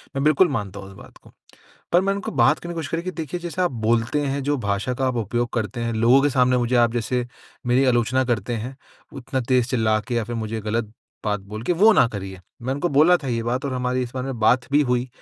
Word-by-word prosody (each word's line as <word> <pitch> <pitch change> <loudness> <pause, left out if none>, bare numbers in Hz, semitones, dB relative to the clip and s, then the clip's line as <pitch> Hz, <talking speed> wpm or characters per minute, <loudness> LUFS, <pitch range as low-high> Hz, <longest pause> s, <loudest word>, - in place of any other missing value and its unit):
मैं 135 - -1
बिल्कुल 155 +4 +4
मानता 100 -6 -4
हूँ 95 - -9
उस 95 - -13
बात - - -14
को। - - -20 0.6
पर 175 - +5
मैंने 195 +1 0
उनको 200 - -5
बात 135 +6 +3
करने 175 0 -6
की - - -10
कोशिश 160 -4 -4
करी 165 - -1
कि 185 - -3
देखिए 160 +1 -5
जैसे 175 +1 -4
आप 180 - +1
बोलते 115 +3 0
हैं, 140 0 -2
जो 145 +1 0
भाषा 105 +2 -2
का 130 +1 -2
आप 130 - -1
उपयोग 120 +2 -1
करते 115 +2 -3
हैं, 115 0 -2
लोगों 120 +5 +4
के 145 - +2
सामने 125 -1 +3
मुझे 120 +1 0
आप 120 -1 +3
जैसे 120 +1 -1 0.4
मेरी 125 +3 +3
आलोचना 125 +1 +2
करते 120 -2 -1
हैं, 120 +5 -6 0.4
उतना 130 -1 -3
तेज़ 125 -2 +2
चिल्ला 110 -3 +1
के 125 - -2
या 115 - +1
फ़िर 120 +2 -5
मुझे 110 -1 -4
ग़लत 110 +1 -2 0.3
बात 105 -1 0
बोल 110 +1 -6
के 175 - +1
वो 220 +2 +7
ना 120 - +5
करिए। 95 -2 -6 0.2
मैं 130 +2 -2
उनको 145 +5 -1
बोला 155 +6 +5
था - - -4
ये 115 -2 -1
बात 125 +3 -2
और 135 - -2
हमारी 125 0 -1
इस 120 - -7
बारे 130 0 -4
में 135 -4 -5
बात 120 +3 +3
भी 145 +1 +4
हुई। 125 -2 0
125 Hz, 260 wpm, -22 LUFS, 115-135 Hz, 0.6 s, वो